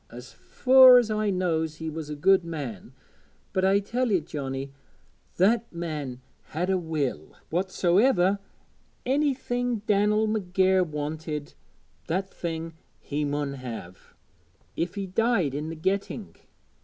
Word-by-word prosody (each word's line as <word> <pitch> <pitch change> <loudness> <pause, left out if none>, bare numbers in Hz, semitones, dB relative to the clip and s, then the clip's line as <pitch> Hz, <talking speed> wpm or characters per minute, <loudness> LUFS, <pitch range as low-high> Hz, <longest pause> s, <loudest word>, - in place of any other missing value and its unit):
As 125 +2 -11
fur 260 -1 +7
as 235 -3 +2
I 215 -1 0
knows, 165 -4 0
he 160 +1 -6
was 160 -1 -5
a 150 - -4
good 190 +5 +4
man; 145 - -6 0.6
but 185 - 0
I 195 +1 +4
tell 235 +4 -1
ye, 190 - +4
Johnnie, 135 -3 -5 0.7
that 230 +5 +2
man 150 -7 -5 0.2
had 175 +5 -2
a 190 - +2
will 150 - -3 0.2
whatsoever 190 +3 +2 0.7
thing 250 -4 0
Dan'el 210 +1 +2
McGair 190 -3 +2
wanted, 150 -1 -5 0.5
that 190 +4 -2
thing 165 -1 -4 0.3
he 150 +1 -3
mun 145 -1 -2
have, 115 -9 -9 0.6
if 170 +3 -2
he 200 -1 -3
died 190 - +1
i' - - -1
the 165 - -5
getting. 195 +5 -3
175 Hz, 130 wpm, -26 LUFS, 150-205 Hz, 0.7 s, fur